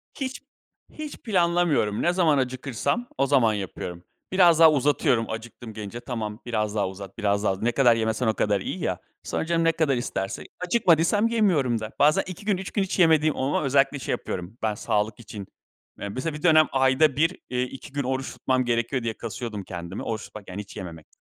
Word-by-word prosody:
Hiç 265 -2 -4 0.5
hiç 305 -1 -7
planlamıyorum. 170 - +1
Ne 175 - +2
zaman 165 -5 +3
acıkırsam 130 - -1
o 135 - +3
zaman 130 -6 +4
yapıyorum. 90 -3 -5 0.3
Biraz 175 -4 +5
daha 160 -1 +9
uzatıyorum 135 -5 +2
acıktım, 115 0 -7
gelince. 110 +2 -6
"Tamam, 110 -4 -5
biraz 105 -3 -1
daha 100 -3 +1
uzat, 95 0 -10
biraz 100 -2 +1
daha. 95 - +2
Ne 120 +2 +2
kadar 120 -3 +4
yemesen 110 +1 0
o 110 - +3
kadar 105 -2 +1
iyi - - -4
ya." - - -2 0.2
Sonra - - -2
canım 165 0 +1
ne 165 - +4
kadar 155 -5 +1
isterse 95 -5 -3 0.2
Acıkmadıysam 180 +1 +3
yemiyorum 175 - +2
da. 110 0 -6
Bazen 150 +2 +4
2 185 +2 -8
gün 205 -3 +2
3 190 +1 -6
gün 200 - +1
hiç 190 0 -3
yemediğim 155 -2 +4
oluyor. 135 +3 0
Özellikle 140 +1 +2
şey - - -4
yapıyorum 90 +5 -4
ben 110 -1 +1
sağlık 105 +1 -1
için. 105 -3 -9 0.5
Ya, 100 - -4
mesela 130 +9 -3
bir 150 - -13
dönem 155 -3 +6
ayda 135 +2 +3
1 165 +5 +2
eee, 125 0 0
2 135 +3 -8
gün 140 0 -1
oruç 130 +1 -2
tutmam 130 -1 0
gerekiyor 120 +2 0
diye 115 -1 -1
kasıyordum 110 -2 -5
kendimi. 85 +1 -6
Oruç 110 -2 -3
tutmak 105 -3 -11
yani 95 +3 -5
hiç 100 - -12
yememek. 80 -4 -8
130 Hz, 195 wpm, -25 LUFS, 110-160 Hz, 0.5 s, daha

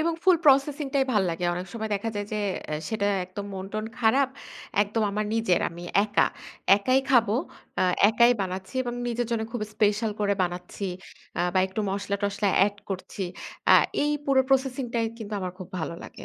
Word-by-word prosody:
এবং 335 +1 +1
ফুল 370 -2 +6
প্রসেসিং 280 +1 +4
টাই 270 -1 +4
ভাল 210 -3 +3
লাগে। 170 +1 -3
অনেক 180 +1 -4
সময় 220 -1 -4
দেখা 200 +3 -2
যায় 205 0 -3
যে, 210 - -1 0.5
সেটা 215 -2 0 0.2
একদম 200 +3 -7
মন-টন 195 +3 -4
খারাপ। 250 +4 +3 0.5
একদম 210 +2 -1
আমার 210 +1 -1
নিজের, 225 -6 +2
আমি 170 +1 -9 0.2
একা। 210 -1 +3 0.5
একাই 255 +6 +2
খাবো। 230 -5 +4 0.5
আ - - +4 0.3
একাই 235 +2 +5
বানাচ্ছি 190 +3 -5
এবং 240 -1 -4
নিজের 240 0 -1
জন্য 230 -1 0
খুব 240 -3 -3
স্পেশাল 215 +1 +2
করে 200 -1 +2
বানাচ্ছি 180 +2 -4 0.5
আ - - +2
বা - - +4
একটু 190 +3 -4
মসলা-টসলা 200 +1 -1 0.2
এড 205 0 -4
করছি। 195 0 -4 0.5
আ - - +10 0.3
এই 295 - +2
পুরো 275 -2 +4
প্রসেসিং 265 -1 +1
টাই 230 -1 +2
কিন্তু 215 -2 -7
আমার 185 -1 -3
খুব 185 - -8
ভালো 170 0 -3
লাগে। - - -10
215 Hz, 175 wpm, -26 LUFS, 195-240 Hz, 0.5 s, আ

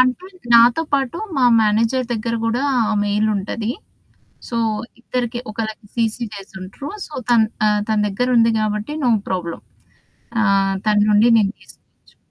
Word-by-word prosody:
అంటే 255 +9 +1 0.3
నాతో 240 +6 +6
పాటు 275 +2 0 0.2
మా 260 - +3 0.2
మేనేజర్ 225 +4 +2
దెగ్గర 230 +1 -2
గూడా 235 +4 0 0.3
ఆ - - 0
మెయిల్ 210 +1 +1
ఉంటది. 215 +3 -3 0.8
సో 235 - -4 0.4
ఇద్దరికి 240 0 -3
ఒకళకి 220 0 -5
సీసీ 230 0 -1
జేసుంట్రు. 195 +7 -9 0.2
సో 310 - -18 0.2
తన్ 225 -2 +5 0.2
ఆహ్, 210 0 +2
తన 215 -1 +1
దెగ్గర 245 +6 -1
ఉంది 230 0 +4
గాబట్టి 215 +5 -2
నో 245 - +3 0.2
ప్రాబ్లమ్. 175 -3 -4 0.8
ఆహ్, 195 -1 +2
తన 210 -1 +3
నుండి 210 +3 +5
నేను 200 -1 +1
తీసుకోవచ్చు. - - -21
220 Hz, 140 wpm, -20 LUFS, 210-240 Hz, 0.8 s, నాతో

